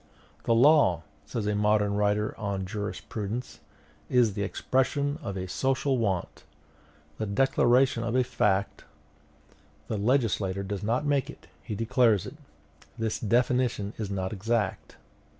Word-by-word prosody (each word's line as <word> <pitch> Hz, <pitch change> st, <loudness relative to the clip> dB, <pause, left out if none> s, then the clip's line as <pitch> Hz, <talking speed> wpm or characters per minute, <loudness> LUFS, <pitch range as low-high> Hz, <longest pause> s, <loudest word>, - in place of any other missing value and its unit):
"The 115 Hz, -, +3 dB
law," 115 Hz, -, +5 dB, 0.2 s
says 105 Hz, +7 st, -3 dB
a 105 Hz, -, 0 dB
modern 105 Hz, 0 st, +2 dB
writer 105 Hz, +1 st, 0 dB
on 100 Hz, -3 st, -2 dB
jurisprudence, 105 Hz, +3 st, -5 dB, 0.5 s
"is 120 Hz, -5 st, +3 dB
the 100 Hz, -, -4 dB
expression 140 Hz, +7 st, 0 dB
of 100 Hz, -8 st, -5 dB
a 95 Hz, 0 st, -4 dB
social 130 Hz, +6 st, 0 dB
want, 95 Hz, -6 st, -2 dB, 0.8 s
the 110 Hz, -, -2 dB
declaration 125 Hz, +2 st, +3 dB
of 115 Hz, +1 st, -2 dB
a 130 Hz, -, +4 dB
fact: 100 Hz, -5 st, 0 dB, 1.1 s
the 110 Hz, -, -2 dB
legislator 105 Hz, -5 st, +1 dB
does 100 Hz, 0 st, -4 dB
not 115 Hz, +7 st, 0 dB
make 145 Hz, -3 st, +1 dB
it, -, -, -11 dB, 0.2 s
he 105 Hz, -, -5 dB
declares 115 Hz, -2 st, +2 dB
it. -, -, -9 dB, 0.6 s
'This 110 Hz, -1 st, -2 dB
definition 120 Hz, -2 st, +1 dB
is 105 Hz, -3 st, -3 dB
not 95 Hz, 0 st, -3 dB
exact. 105 Hz, 0 st, -2 dB
110 Hz, 135 wpm, -27 LUFS, 100-125 Hz, 1.1 s, law